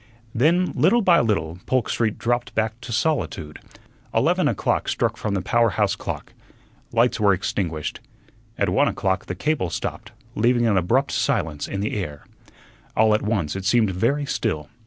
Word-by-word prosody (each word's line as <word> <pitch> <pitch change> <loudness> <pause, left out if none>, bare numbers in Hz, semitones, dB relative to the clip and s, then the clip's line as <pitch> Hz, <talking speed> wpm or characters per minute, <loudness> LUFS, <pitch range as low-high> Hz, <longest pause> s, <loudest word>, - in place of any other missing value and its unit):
Then, 170 +9 +2
little 220 +8 +3
by 175 -3 +5
little, 90 -7 -1
Polk 130 -2 +1
Street 110 -3 0
dropped 120 +1 -1
back 110 +2 -1
to 120 - -8
solitude. 110 - -1 0.6
Eleven - - +3
o'clock - - 0
struck - - 0
from 105 -2 -2
the 95 - -2
power 115 +4 +3
house 100 -1 +1
clock. - - -6 0.6
Lights 115 0 +2
were 100 -2 +4
extinguished. 85 -4 -3 0.6
At - - +1
one - - +3
o'clock 95 -1 -1
the 90 - -4
cable 135 - -1
stopped, - - -5 0.2
leaving 120 +2 +2
an 110 -3 +3
abrupt 115 +10 +2
silence 75 -2 -1
in 100 - -3
the 105 - -2
air. 75 -8 -5 0.7
All 110 0 +5
at 105 - +2
once 100 -8 -1
it 95 - -4
seemed 110 -1 +3
very 125 +11 0
still. 95 - -2
110 Hz, 165 wpm, -23 LUFS, 95-120 Hz, 0.7 s, by